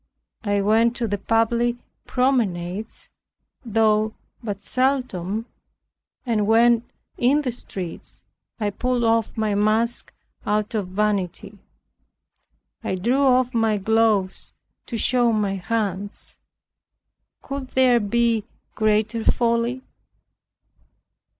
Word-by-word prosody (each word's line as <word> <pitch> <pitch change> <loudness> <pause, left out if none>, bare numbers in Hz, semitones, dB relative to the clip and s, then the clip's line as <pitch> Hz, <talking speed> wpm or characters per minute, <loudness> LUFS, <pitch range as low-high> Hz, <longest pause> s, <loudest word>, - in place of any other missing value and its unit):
I 205 -2 +1
went 225 +3 +3
to 240 -1 -1
the 205 -1 -2
public 230 +3 +1 0.3
promenades 215 -6 -1 0.5
(though 220 -1 +2 0.3
but 205 -4 -5
seldom) 245 -6 -1 0.8
and 215 -4 +1
when 230 +1 +5 0.4
in 280 +5 +3
the 255 - -1
streets, 190 -7 -8 0.4
I 210 -2 0
pulled 250 +3 -1
off 225 -1 +1
my 215 -1 0
mask 215 +3 +1 0.3
out 210 +1 -1
of 210 -4 -1
vanity. 200 0 -2 1.2
I - - -1
drew 240 +9 +1
off 255 -2 +3
my 225 -2 +2
gloves 210 -2 +1 0.3
to 235 - -3
show 240 +1 +3
my 205 -3 0
hands. 200 +1 -3 1.1
Could 275 -1 -5
there 255 -2 +4
be 230 0 +1 0.3
greater 215 +1 +1
folly? 235 +2 +1
225 Hz, 100 wpm, -23 LUFS, 205-240 Hz, 1.2 s, when